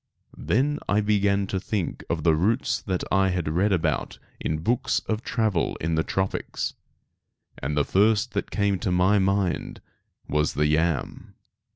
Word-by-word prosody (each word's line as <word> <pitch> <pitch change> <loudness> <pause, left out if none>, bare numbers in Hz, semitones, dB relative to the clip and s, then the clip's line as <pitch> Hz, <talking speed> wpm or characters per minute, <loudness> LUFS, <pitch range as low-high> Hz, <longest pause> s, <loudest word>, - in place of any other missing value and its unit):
Then 145 +6 +1
I 105 - +3
began 100 -1 +2
to 95 0 -2
think 95 -1 -3
of 80 -2 -1
the 80 - +4
roots 105 - +1
that 95 -3 -2
I 95 +1 +4
had 90 -3 -1
read 90 +7 +1
about 90 -4 0 0.2
in 80 0 -2
books 120 +6 +1
of 110 0 -3
travel 110 -9 0
in 80 +1 -2
the 80 - +2
tropics, 95 +3 -2 0.9
and 75 +3 -3
the 75 - +3
first 105 +2 +2
that - - -2
came 100 -2 0
to 100 - -1
my 95 +3 +3
mind 95 -3 0 0.5
was 75 +1 +1
the 75 - +2
yam. 75 0 -1
95 Hz, 160 wpm, -25 LUFS, 80-105 Hz, 0.9 s, the